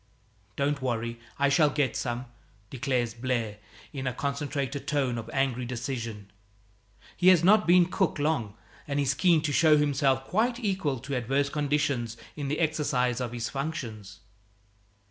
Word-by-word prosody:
"Don't 140 0 0
worry; 115 -2 -2 0.2
I 140 0 +3
shall 150 +1 +4
get 140 -4 0
some," 120 0 -3 0.5
declares 125 -3 -1
Blaire 115 -3 -2 0.3
in 135 -2 -4
a 130 - -1
concentrated 140 0 -3
tone 135 -5 0
of 115 - -8
angry 135 -2 0
decision. 115 -4 -5 0.8
He 180 - +1
has 180 -3 +7
not 210 +2 +5
been 175 0 +6
cook 185 0 0
long, 145 -9 -1 0.3
and 140 0 -1
is 140 -1 +2
keen 165 +1 +3
to 150 - 0
show 155 0 +5
himself 140 -2 +2
quite 235 - 0
equal 190 - -1
to 140 +2 -4
adverse 135 +4 0
conditions 140 -6 -1 0.2
in 145 -2 -4
the 150 +3 -1
exercise 135 -6 0
of 120 -2 -3
his 120 -1 -3
functions. 120 - -5
140 Hz, 150 wpm, -28 LUFS, 120-150 Hz, 0.8 s, has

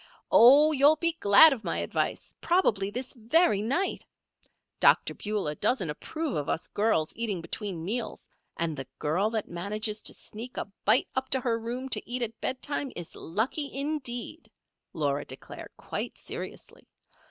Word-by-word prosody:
"Oh, 285 +6 +8
you'll 290 +1 +5
be 335 +2 +1
glad 205 +10 +8
of 230 -5 -7
my - - -2
advice - - -2
probably 215 - +2
this 250 +4 -5
very 235 - +2
night. 275 - -1 0.8
Dr. - - +4
Beulah 205 -8 -3
doesn't 185 - 0
approve 310 - -4
of 145 - -2
us 160 - -1
girls 205 -7 0
eating 220 -5 -1
between 170 0 -4
meals, 230 +5 -3 0.3
and 165 -2 -1
the 135 -2 -6
girl 180 +8 0
that 220 -2 -3
manages 210 +5 -3
to - - -3
sneak 235 +4 -7
a - - -2 0.2
bite 250 - +3
up 260 0 -2
to 265 - +1
her 235 -2 0
room 245 +3 -5
to - - -2
eat 245 0 -1
at 225 -1 -5
bedtime 275 +1 -2
is 175 -2 -7
lucky, 245 - -2
indeed," 275 0 -3 0.4
Laura 145 -2 -1
declared, - - -9
quite - - -5
seriously. - - -7
230 Hz, 155 wpm, -28 LUFS, 195-265 Hz, 0.8 s, Oh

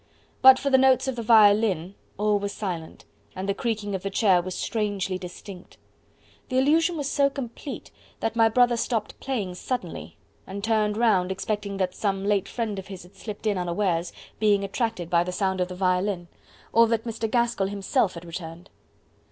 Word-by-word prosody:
But 260 0 +9
for 275 +1 -2
the 265 - +6
tones 260 0 +4
of 265 - -1
the 235 - -4
violin, 205 -5 +4 0.2
all 210 0 +2
was 200 0 -4
silent, 175 -6 -6 0.3
and 190 +1 -4
the 200 - +1
creaking 210 -1 -3
of 190 - -2
the 195 - -3
chair 195 -3 +3
was 185 +1 -6
strangely 200 -4 -2
distinct. 180 +1 -10 0.7
The 255 - 0
illusion 320 +5 +3
was 290 -2 -2
so 280 -1 +2
complete 270 0 -7 0.3
that 225 - -2
my 225 -1 +5
brother 240 +1 +3
stopped 225 -2 -2
playing 220 -9 -3
suddenly, 180 -2 -5 0.3
and 200 +1 -6
turned 215 -1 +1
round 195 -6 +2
expecting 200 +1 -3
that 185 -1 -1
some 195 -1 -2
late 200 -1 +1
friend 220 -4 -3
of 190 - -9
his 190 -3 -9
had 180 +2 -17
slipped 210 +2 -8
in 205 -3 +1
unawares, 175 -1 -1 0.3
being 205 -2 +3
attracted 210 -3 -2
by 170 0 +3
the 180 - -4
sound 190 0 -1
of 180 - +1
the 180 - -7
violin, 185 -1 0 0.4
or 230 0 +6
that 225 -1 0
Mr. 225 -1 -3
Gaskell 235 -4 +1
himself 200 +1 0
had 170 +1 -9
returned. 170 +1 -8
205 Hz, 185 wpm, -25 LUFS, 185-230 Hz, 0.7 s, But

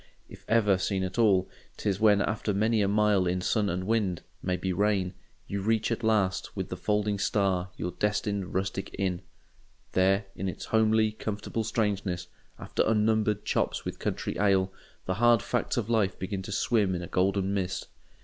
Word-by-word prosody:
If - - -13
ever 105 -5 +3
seen 95 0 -1
at 95 +5 -3
all, 95 -5 +4 0.3
'tis 100 -2 -1
when 105 -2 +5
after 105 -1 -1
many 110 +2 +2
a 100 - +2
mile 105 -2 +3
in 90 +1 0
sun 105 +2 +1
and 90 0 -2
wind—maybe 95 -3 -2
rain—you 100 0 -2
reach 110 +3 +1
at 115 +1 -2
last, 105 -4 +1
with - - -3
the - - -3
folding 105 -1 0
star, 95 -3 +1
your 90 +2 -3
destined 105 0 -1
rustic 95 +1 -2
inn. 95 -2 -1 0.7
There, 95 +2 +3
in 95 +1 -2
its - - -6
homely, 110 0 +3
comfortable 110 +1 -4
strangeness, 100 -5 -1 0.3
after - - -2
unnumbered 110 -1 +1
chops - - -1
with - - -5
country - - -3
ale, 95 -2 +2 0.3
the 95 - 0
hard 120 -1 +5
facts 120 0 -1
of 115 -4 0
life 110 -4 +1
begin 95 +1 -4
to 100 - -7
swim 100 -2 +1
in 90 - -4
a - - -6
golden 95 +2 +1
mist. 95 -2 -2
100 Hz, 170 wpm, -28 LUFS, 95-110 Hz, 0.7 s, when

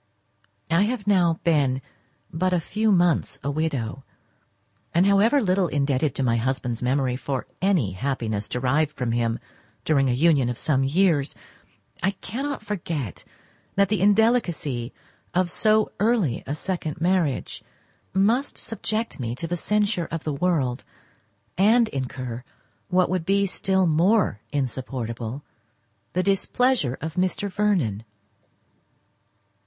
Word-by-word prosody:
I 165 +3 +4
have 230 -2 -3
now 175 -5 +3
been 140 -6 +2 0.5
but 185 +3 0
a 180 - +3
few 215 +6 0
months 175 -7 +2
a 140 - -1
widow, 135 -5 -2 0.9
and, 175 +2 +5
however 205 +8 +4
little 190 -5 +2
indebted 140 -2 0
to 135 - -1
my 115 -2 +2
husband's 125 -1 -2
memory 130 0 +1
for 135 0 -3 0.2
any 180 - +2
happiness 110 -1 -3
derived 140 +5 +1
from 125 -5 -3
him 115 -1 0 0.5
during 135 -4 +3
a - - +2
union 140 -2 +3
of 120 - -3
some 135 -3 +1
years, 155 0 +2 0.7
I 195 +2 +1
cannot 270 +6 -4
forget 165 - -4 0.5
that 200 -1 +3
the 210 -4 0
indelicacy 195 - +2 0.4
of 180 -1 +2
so 215 +4 +2
early 210 - +1
a 145 - -2
second 170 -1 -4
marriage 170 -5 0 0.5
must 225 +9 +1
subject 225 -2 -3
me 120 -1 -3
to 165 - -5
the 175 +2 -2
censure 205 -1 0
of 165 -1 -4
the 155 - -2
world, 140 -6 0 0.8
and 225 +4 +5
incur, 130 -2 -5 0.4
what 180 0 +3
would 185 -3 0
be 200 +3 +2
still 190 0 +1
more 175 - +3
insupportable, 125 -2 -4 0.7
the 185 - +1
displeasure 195 - +1
of 160 +1 -4
Mr. 185 +2 0
Vernon. 180 - 0
165 Hz, 130 wpm, -24 LUFS, 130-195 Hz, 0.9 s, and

